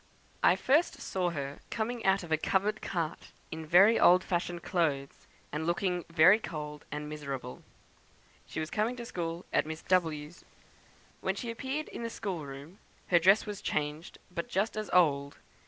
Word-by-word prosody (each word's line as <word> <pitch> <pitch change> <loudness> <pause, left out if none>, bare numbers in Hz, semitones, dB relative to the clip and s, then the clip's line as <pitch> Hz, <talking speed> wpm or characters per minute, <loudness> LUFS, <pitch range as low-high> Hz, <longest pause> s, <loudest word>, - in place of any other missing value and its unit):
"I - - +6
first 300 +7 +2
saw 185 -2 -1
her 140 -4 -5
coming 230 +1 -3
out 190 0 +3
of 170 - -9
a 160 - +4
covered 200 +6 0
cart, 170 -3 -3 0.2
in 160 0 -6
very 195 +8 +6
old 180 +1 +6
fashioned 175 -1 -2
clothes, 145 -7 -1 0.2
and 155 +2 -3
looking 180 0 0
very 175 +5 +6
cold 150 -6 -6
and 150 0 -4
miserable. 140 -4 -6 0.9
She - - -5
was 155 +1 -4
coming 220 +4 0
to 240 -1 -7
school 170 -4 -4
at - - +2
Miss 160 0 -6
W 160 -5 +1
's. 175 - -18 0.8
When - - -1
she 235 -3 -4
appeared 265 +6 -4
in - - -7
the 230 - -3
schoolroom, 165 -5 -6 0.3
her 175 - +6
dress 195 +5 +5
was 210 -2 -6
changed, 150 +2 -3
but 170 -1 -4
just 200 +4 0
as 215 -1 -4
old. 145 -5 +3
175 Hz, 170 wpm, -30 LUFS, 150-200 Hz, 0.9 s, I